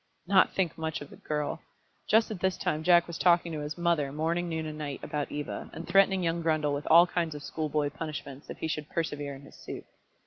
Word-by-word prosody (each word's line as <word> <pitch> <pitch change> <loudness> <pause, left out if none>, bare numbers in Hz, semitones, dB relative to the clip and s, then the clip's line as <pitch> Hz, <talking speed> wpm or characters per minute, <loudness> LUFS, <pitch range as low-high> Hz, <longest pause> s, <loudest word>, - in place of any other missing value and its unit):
Not 190 +1 +4
think 175 -4 0
much 160 -1 -2
of 145 - -9
the - - -10
girl! 150 -1 -3 0.5
Just 220 +1 +4
at 205 - -4
this 190 0 +1
time 155 - -1
Jack 175 +1 +5
was 170 - -7
talking 175 -1 +4
to 155 - -3
his 150 +2 -5
mother, 170 -5 +1
morning, 165 +4 -1
noon, 160 -1 -2
and 155 -1 -5
night, 145 -3 -4
about 145 -1 -3
Eva, 145 0 -5
and - - -7
threatening 190 0 +4
young 170 0 0
Grundle 155 -3 +1
with 145 +1 -3
all 170 +2 +9
kinds 170 -3 -2
of 145 - -7
schoolboy 150 -1 -1
punishments 145 -3 -7
if - - -6
he - - -3
should 150 -1 -3
persevere 145 -4 -3
in 135 - -13
his - - -14
suit. - - -7
160 Hz, 230 wpm, -29 LUFS, 150-170 Hz, 0.5 s, all